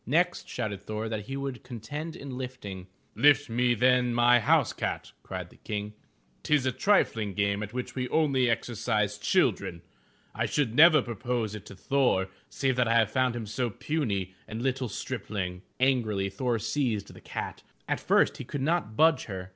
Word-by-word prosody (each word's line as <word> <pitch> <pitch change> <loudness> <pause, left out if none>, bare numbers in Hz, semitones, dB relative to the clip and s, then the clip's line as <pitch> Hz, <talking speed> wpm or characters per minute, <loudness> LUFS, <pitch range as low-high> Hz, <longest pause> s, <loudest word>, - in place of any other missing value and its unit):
Next 175 +7 +1
shouted 105 -5 -3
Thor 110 +2 -4
that 105 -2 -4
he 135 - -4
would 135 -3 -4
contend 145 +7 -6
in 135 -2 -7
lifting. 115 -8 -7 0.3
"Lift 145 -3 +4
me 120 +1 +2
then 125 0 +3
my 120 +1 +6
house 110 - +3
cat,'* - - -3
cried 90 -2 -6
the - - -18
King. 105 0 -4 0.2
" - - -38
'Tis 150 -3 +2
a 130 - +2
triflng 115 - +1
game 100 +1 +1
at 105 -1 -5
which 125 +1 -4
we 125 -1 -3
only 135 -6 +2
exercise 110 -2 0
children. 85 -4 +1 0.5
I - - -1
should 140 -7 0
never 155 0 +7
propose 120 -1 -2
it 105 -3 -8
to - - -10
Thor 100 -4 +1 0.2
save 130 -2 0
that 125 -2 +3
I 115 - +2
have 110 -2 +4
found 130 -1 +1
him 115 -2 -4
so 120 +4 -2
puny 100 - -2
a 110 - -7
little 130 +1 -1
stripling." 100 -6 -4 0.2
Angrily, 110 -7 +1
Thor 120 +4 0
seized 115 -2 -1
the - - -14
cat. - - -5 0.3
At - - 0
first - - +3
he - - -6
could 145 - -5
not 155 -8 0
budge 160 +1 +4
her. 95 -3 -6
120 Hz, 180 wpm, -28 LUFS, 105-130 Hz, 0.5 s, never